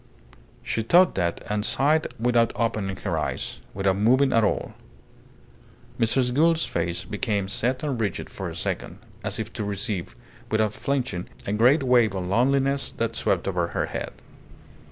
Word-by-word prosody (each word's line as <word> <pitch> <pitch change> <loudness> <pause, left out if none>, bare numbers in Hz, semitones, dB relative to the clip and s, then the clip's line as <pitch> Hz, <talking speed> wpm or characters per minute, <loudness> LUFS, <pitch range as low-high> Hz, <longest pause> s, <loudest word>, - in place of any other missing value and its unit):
She 115 - -1
thought 175 +11 +5
that, 85 -3 -1
and 105 0 -1
sighed 150 +7 +2
without 120 0 +3
opening 105 -4 -1
her - - -2
eyes - - -3 0.2
without 95 0 +1
moving 130 +6 +4
at 115 - +4
all. 105 - 0 1.3
Mrs. 125 +2 +2
Gould's 165 +3 +3
face 85 +2 -2
became 105 -2 -1
set 125 +7 0
and 135 -6 -1
rigid 100 -5 -2
for - - -6
a - - -8
second, - - -3 0.3
as - - -2
if 110 0 -5
to 110 - -3
receive, 100 -2 -3 0.3
without 110 -1 +1
flinching, 130 -11 -2 0.2
a 100 - -2
great 125 +7 +4
wave 120 -5 +3
of 95 -1 -3
loneliness 135 +7 +2
that 115 0 -1
swept 90 -1 0
over 90 -3 0
her - - -1
head. - - -5
110 Hz, 155 wpm, -25 LUFS, 100-130 Hz, 1.3 s, thought